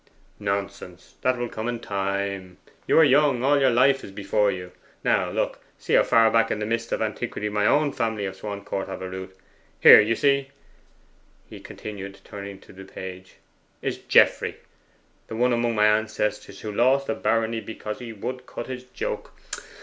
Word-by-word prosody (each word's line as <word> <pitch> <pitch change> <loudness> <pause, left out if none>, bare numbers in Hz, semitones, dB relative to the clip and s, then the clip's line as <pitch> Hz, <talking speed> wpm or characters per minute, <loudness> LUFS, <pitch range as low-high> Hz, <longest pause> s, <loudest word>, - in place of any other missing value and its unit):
'Nonsense! 100 -3 -4
that 130 0 +1
will 120 0 -2
come 110 0 -5
with 120 -1 -3
time. 100 -2 -3 0.3
You - - +4
are 160 - +8
young: 140 -3 +4
all 145 +2 +4
your 135 -1 +4
life 130 +3 +3
is - - -8
before 100 +1 +1
you. 90 -2 -5 0.3
Now - - +2
look - - -2 0.2
see - - -4
how - - +7
far 115 -1 +4
back 115 0 +3
in - - -1
the 105 - -3
mists 115 +1 -2
of - - 0
antiquity 110 -1 -3
my 105 0 +1
own 145 +2 +3
family 110 -5 -2
of 95 -1 -5
Swancourt 100 -1 -5
have 95 -1 -6
a - - -4
root. 95 0 -8 0.4
Here, - - +10
you 110 +2 +1
see,' 140 0 +2 1.0
he - - -11
continued, 100 -2 -8
turning 100 -1 -8
to - - -16
the 95 +1 -11
page, 95 -1 -9 0.5
'is - - -2
Geoffrey, - - +3 0.7
the 110 - -6
one 125 +2 +2
among 120 -1 0
my 105 0 +4
ancestors 105 0 0
who 105 - -5
lost 130 +6 +2
a - - 0
barony 115 0 0
because 105 -1 -6
he 120 -2 -7
would 125 +4 -6
cut 120 - -6
his 130 -1 -7
joke. 125 - -5
110 Hz, 180 wpm, -25 LUFS, 100-120 Hz, 1.0 s, Here